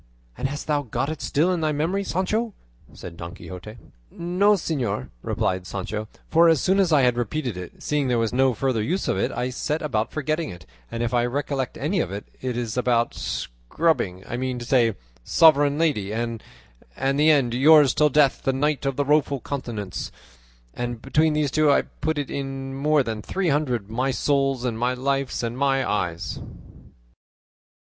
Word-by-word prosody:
"And - - -1
hast 145 +1 -5
thou 150 -1 +1
got 135 +3 -2
it 155 - -6
still 170 +6 +1
in 175 - -1
thy 155 -1 +1
memory, 165 +7 0
Sancho?" 205 +5 -1 0.4
said 85 -1 -10
Don 85 +1 -7
Quixote. 100 +5 -9 0.3
"No, 180 - +2
señor," 130 - -2
replied 90 -1 -1
Sancho, 105 +3 -4 0.2
"for 165 +1 +5
as 160 -3 +4
soon 190 +1 +2
as 185 -4 +3
I 150 -3 +5
had 125 -1 +3
repeated 120 0 -2
it, 90 -1 -9
seeing 150 -2 0
there 125 -1 +2
was 115 0 0
no 130 -1 +3
further 130 -2 0
use 175 - -1
for - - 0
it, - - 0
I 125 +2 -2
set 150 +5 -2
about 115 -7 -1
forgetting 155 +1 -2
it; 85 -2 -10 0.2
and 115 0 -3
if 120 +1 -2
I 120 -1 +3
recollect 135 0 -2
any 170 +7 0
of 155 - -1
it, 100 +1 -5 0.2
it 125 -2 -2
is 115 -3 -2
that 125 - -1
about 120 -2 +1
'Scrubbing,' 95 - -2
I 120 - -3
mean 130 0 -2
to 120 - -6
say 120 -4 +3 0.3
'Sovereign 145 - +5
Lady,' 145 -12 +1
and 115 0 -3 0.6
the 140 +3 +2
end 135 -6 +3
'Yours 145 +1 +6
till 150 0 +4
death, 145 -1 +3
the 135 - +1
Knight 145 +1 0
of 135 - -1
the 145 - 0
Rueful 145 -1 +2
Countenance;' 115 -9 -5 0.6
and 120 -1 -4
between 155 +5 +2
these 150 -2 0
two 155 0 +3
I - - +4
put 160 0 -3
into 145 -2 -3
it 140 - -2
more 135 +2 0
than 110 -3 -4
three 185 - -1
hundred 130 -8 0
'my 125 +5 -1
souls' 135 -1 +1
and 115 -3 -2
'my 125 +1 +1
life's' 135 0 -1
and 115 0 -2
'my 135 0 +1
eyes." 85 -5 -2
135 Hz, 190 wpm, -24 LUFS, 115-150 Hz, 0.6 s, Yours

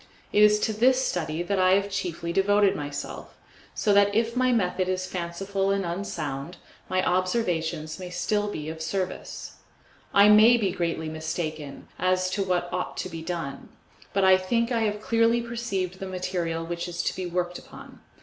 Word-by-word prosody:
It 210 - +5
is 210 0 +6
to 220 - 0
this 255 +4 +3
study 165 -1 -2
that 195 +2 -1
I 185 0 +5
have 200 +1 +1
chiefly 170 -3 -3
devoted 200 +1 +3
myself, 145 -1 -6 0.4
so 210 - +2
that 200 0 +4
if 230 +1 +1
my 255 0 +3
method 185 -5 +1
is 185 0 -1
fanciful 190 +2 -2
and 195 -1 +1
unsound, 170 -4 -4 0.3
my 185 0 +1
observations 175 -5 -1
may 180 -1 -6
still 205 +4 0
be 155 -7 -5
of 160 0 -6
service. 185 +3 -4 0.5
I 200 +1 +7
may 215 +3 +7
be 200 -5 0
greatly 170 -3 -2
mistaken 155 -2 -5
as 185 0 +1
to 200 +1 0
what 180 -2 0
ought 180 0 -3
to - - -3
be 165 -2 -7
done, 165 -4 -5 0.4
but 195 - +1
I 190 0 +7
think 230 +6 0
I 235 - +2
have 210 0 -2
clearly 230 +1 +3
perceived 215 -6 -3
the 195 - -5
material 180 -3 -2
which 170 +1 -4
is 175 0 -3
to - - -1
be 185 -1 -4
worked 175 0 -2
upon. - - -13
185 Hz, 180 wpm, -26 LUFS, 170-205 Hz, 0.5 s, I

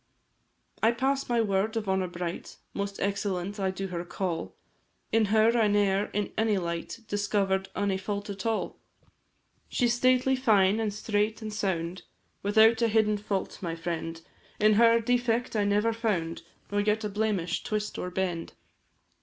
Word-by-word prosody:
I 225 +2 +4
pass 270 +3 0
my 240 -1 +3
word 210 +1 0
of 215 -2 -3
honour 190 -1 +1
bright 175 -1 -6 0.2
Most 200 0 -4
excellent 200 0 -2
I 190 -1 +1
do 190 +1 -4
her 175 -1 -3
call; 175 -1 -4 0.6
In 225 -1 +4
her 220 +3 +4
I 225 -3 +4
ne'er, 205 -1 +2
in 210 -1 -3
any 220 -2 +2
light, 170 +5 -4
Discover'd 200 -2 0
any 200 -2 0
fault 200 +1 -4
at 200 -2 -6
all. 225 -1 -2 0.9
She 250 - +1
is 235 - +3
stately, 255 +2 +3
fine, 215 -5 +3
an' 220 -1 0
straight, 210 +1 -1
an' 215 - -4
sound, 180 -4 -2 0.4
Without 220 +3 +5
a 230 - +4
hidden 215 -1 +2
fault, 200 -2 -3
my 170 -3 -3
friend; 165 -1 -4 0.4
In 215 0 +5
her, 230 +2 +6
defect 240 0 0
I 205 -1 +2
never 210 +3 +2
found, 195 -8 -1 0.3
Nor 205 0 +1
yet 210 +1 +1
a - - 0
blemish, 200 -5 -1
twist, 210 -1 -3
or 180 - -3
bend. 180 -2 -3
205 Hz, 160 wpm, -28 LUFS, 190-220 Hz, 0.9 s, her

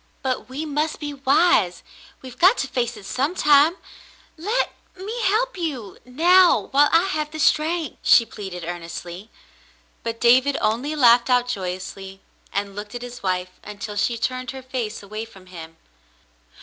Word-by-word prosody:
"But 255 -1 -2
we 280 +5 -5
must 300 +1 -2
be 290 -1 -5
wise. 270 - +2 0.4
We've 255 -1 -11
got 380 +7 +6
to - - -2
face 240 -2 -2
it 205 - -12
sometime. 295 - +3 0.6
Let 420 +10 -1
— - - -33
me 430 +6 -5
help 485 +6 +1
you 260 - -5
— - - -37
now 335 - +4
while 290 +2 +5
I 330 +1 +5
have 305 -6 -2
the 310 - -8
strength," 315 0 +1
she 230 - +5
pleaded 190 -6 -8
earnestly. 175 +3 -7 0.7
But 230 0 -5
David 260 +4 +4
only 240 +8 -1
laughed 245 -3 +5
out 250 -1 +3
joyously, 190 -1 -5 0.3
and 200 0 -3
looked 205 +2 -7
at 245 - -6
his 245 0 -9
wife 185 -1 -3
until 210 0 -7
she 230 +3 0
turned 255 +2 -3
her 265 -1 -7
face 245 -5 -5
away 215 +2 -6
from 195 -5 -14
him. 165 -3 -11
250 Hz, 160 wpm, -22 LUFS, 205-300 Hz, 0.7 s, got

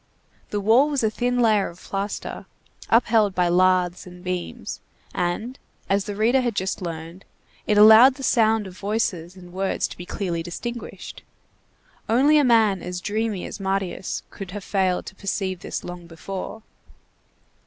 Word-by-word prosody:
The 205 - -2
wall 230 +8 +4
was 280 -5 -1
a 220 - +2
thin 245 +2 0
layer 215 -4 +3
of 170 - -14
plaster 200 +2 -5 0.4
upheld 220 -4 +3
by 180 -1 +2
lathes 180 0 +2
and 180 0 -12
beams, 180 -1 -4 0.3
and, 215 +9 -2 0.3
as 195 0 +1
the 205 -2 -5
reader 235 +5 +3
had 240 -4 -1
just 190 0 -2
learned, 165 +1 -7 0.4
it 210 - +2
allowed 220 +5 +9
the 270 - -9
sound 225 -4 +3
of 185 -1 -10
voices 195 -4 -2
and 180 -2 -13
words 190 +1 -1
to - - -10
be 175 - -9
clearly 175 -4 -3
distinguished. 235 +8 -7 0.9
Only 280 +7 +5
a - - +4
man 220 -7 +4
as 180 0 -5
dreamy 210 0 -2
as - - -7
Marius 195 -1 -2
could 195 -2 -8
have 200 +1 -7
failed 190 -2 0
to - - -8
perceive 190 -1 -3
this - - -5
long 175 -1 -8
before. 195 +5 -7
195 Hz, 160 wpm, -23 LUFS, 180-225 Hz, 0.9 s, allowed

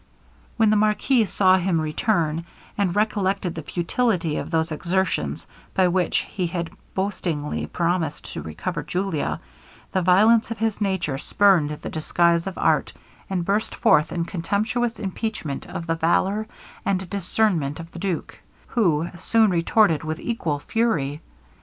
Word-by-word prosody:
When 220 -2 +4
the - - +4
marquis 215 +3 +3
saw 190 -1 +4
him 180 -2 +1
return, 160 0 0 0.3
and 195 -4 0
recollected 200 -4 0
the 160 - -5
futility 175 - 0
of - - -4
those 160 0 0
exertions, 185 +4 -1 0.3
by 185 -1 +4
which 180 -1 +1
he 185 -3 -2
had 170 -1 -3 0.2
boastingly 175 -6 -2
promised 170 -3 -2
to - - -4
recover 150 - -4
Julia, 175 +1 -2 0.5
the 185 - +1
violence 215 +6 +5
of 230 - -4
his 220 -1 -1
nature 185 -9 -1
spurned 185 -4 +3
the 150 - -6
disguise 170 +2 +2
of 190 - -5
art, - - +2 0.4
and 180 -3 -1
burst 205 +3 0
forth 150 - +3
in 170 -1 -1
contemptuous 215 +7 -1
impeachment 195 -7 -4
of 165 - -5
the 165 - 0
valour 190 +6 +1 0.4
and 190 -1 0
discernment 180 -6 0
of 165 0 -9
the 170 - -9
duke, 185 -2 -3 0.3
who 170 - +2
soon 220 0 +3
retorted 170 -2 +3
with 155 0 -3
equal 170 -11 -2
fury. 155 -6 -1
180 Hz, 145 wpm, -23 LUFS, 165-205 Hz, 0.5 s, violence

